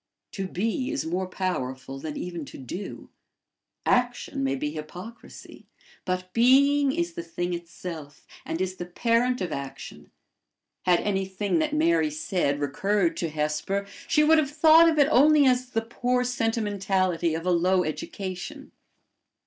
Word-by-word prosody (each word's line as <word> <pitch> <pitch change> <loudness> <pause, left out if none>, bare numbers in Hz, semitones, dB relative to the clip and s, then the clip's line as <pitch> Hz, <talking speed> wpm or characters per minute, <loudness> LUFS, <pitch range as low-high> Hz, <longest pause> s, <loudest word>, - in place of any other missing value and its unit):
To 195 -2 -4
be 225 +8 -2
is 300 -1 -2
more 180 +3 -2
powerful 135 -8 -4
than 150 +1 -6
even 175 -3 -5
to - - -11
do. 175 - -7 0.7
Action 245 - 0
may 135 0 +1
be 150 +2 -3
hypocrisy, 175 +9 -10 0.4
but 185 0 -3
being 275 +4 +5
is 170 -7 -2
the 170 - -5
thing 175 +1 -4
itself, 170 -3 -8 0.2
and 165 - -4
is 185 0 -2
the 175 - -6
parent 235 +6 +1
of 180 -3 -2
action. 140 -1 -7 0.8
Had 175 -1 +4
anything 195 - -1
that 305 -1 0
Mary 325 0 +3
said 190 - -1
recurred 175 +6 0
to 165 - -2
Hesper, 155 +6 -2 0.2
she 300 -2 +4
would 315 +1 +6
have 290 -3 0
thought 315 +2 +6
of 320 - 0
it 285 -1 +5
only 295 +1 +6
as 255 -1 +2
the 225 -2 0
poor 245 +2 0
sentimentality 195 -8 0
of 165 +1 -5
a 180 - +2
low 180 +2 +3
education. 180 +4 -6
190 Hz, 150 wpm, -26 LUFS, 170-250 Hz, 0.8 s, would